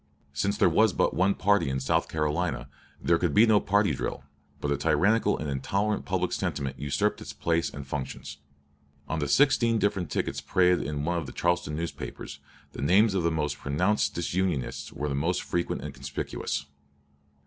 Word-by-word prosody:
Since 100 +8 0
there - - +5
was 105 +4 +4
but - - +1
one 95 +6 +2
party 100 -7 +2
in 65 0 -1
South 65 - 0
Carolina, 75 -3 -1 0.3
there 85 -1 +2
could 85 -5 0
be 110 - +7
no 110 -2 +5
party 100 -4 +2
drill; 65 - -4 0.4
but 70 - -2
a 70 - +1
tyrannical 100 +9 +2
and 75 - -4
intolerant 100 +10 -1
public - - -1
sentiment 70 -2 -3
usurped 70 -1 0
its - - -7
place 85 0 0
and 70 -1 -8
functions. 70 +1 -5 0.7
On 80 - -2
the 75 - -1
sixteen 120 - +4
different 100 -4 0
tickets - - -2
paraded 90 -1 +3
in 75 -1 -3
one 85 +1 0
of 75 - -6
the - - -7
Charleston 85 -2 0
newspapers, 85 +2 -6 0.3
the - - -7
names 95 +9 +4
of 95 - +1
the 85 - +2
most 75 -3 -2
pronounced 90 +9 +1
disunionists 85 -5 -2
were 75 - -3
the 70 - -2
most 80 +6 0
frequent 85 0 -2
and - - -6
conspicuous. - - -4
85 Hz, 180 wpm, -27 LUFS, 70-100 Hz, 0.7 s, be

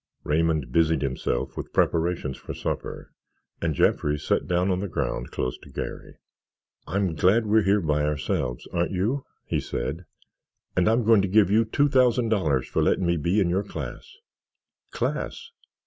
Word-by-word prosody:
Raymond 75 -4 +1
busied 80 -1 +2
himself 65 -2 -2
with - - -7
preparations 85 -5 +1
for - - -8
supper - - -5 0.5
and 80 -3 0
Jeffrey 75 +2 +2
sat - - -1
down 90 +1 +1
on 90 - 0
the 100 - -3
ground - - -3
close 60 - -3
to - - -15
Garry. - - -6 0.7
"I'm 95 0 0
glad 95 +9 +3
we're 110 +1 +4
here 100 +1 +3
by 75 -2 +1
ourselves, 75 -3 -2
aren't 85 0 +1
you?" 110 +10 -1 0.2
he - - -1
said, 75 +9 -4 0.7
"and 90 +3 +3
I'm 115 +2 +2
going 110 -2 +5
to 100 - 0
give 100 0 +4
you 110 +2 +4
two 145 +6 +2
thousand 125 -4 +3
dollars 80 - +1
for - - 0
letting 95 - +2
me 85 0 +2
be 85 +6 +1
in 95 - +3
your 95 +3 +1
class." 445 - -8 0.7
"Class?" 460 0 -3
90 Hz, 165 wpm, -25 LUFS, 80-105 Hz, 0.7 s, going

